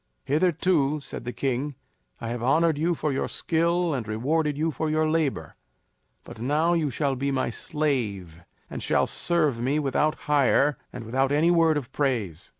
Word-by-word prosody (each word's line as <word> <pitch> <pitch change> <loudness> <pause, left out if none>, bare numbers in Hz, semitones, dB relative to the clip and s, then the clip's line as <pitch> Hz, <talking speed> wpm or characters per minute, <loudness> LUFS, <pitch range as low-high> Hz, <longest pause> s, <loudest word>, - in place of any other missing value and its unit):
"Hitherto," 155 -2 +2
said 135 -3 -8
the 120 - -3
king, 135 +2 -2 0.4
"I 115 - -5
have 120 0 -4
honored 160 +6 +3
you 165 +4 0
for 150 -1 -1
your 135 - -1
skill 170 +1 0
and 120 -6 -3
rewarded 145 +7 0
you 160 +2 0
for 155 +1 -2
your 155 0 +1
labor. 155 - -1 0.7
But 110 - -11
now 150 +7 +2
you 160 -4 +1
shall 135 +2 -1
be 140 +2 -2
my 130 -3 -1
slave 105 - -2 0.3
and - - -7
shall - - +2
serve 155 -8 0
me 130 +5 0
without 150 +1 +1
hire 145 -1 +3
and 120 - -7
without 135 +4 0
any 155 +4 +3
word 165 -3 +4
of 135 -5 -5
praise." 115 - -2
145 Hz, 170 wpm, -26 LUFS, 125-160 Hz, 0.7 s, word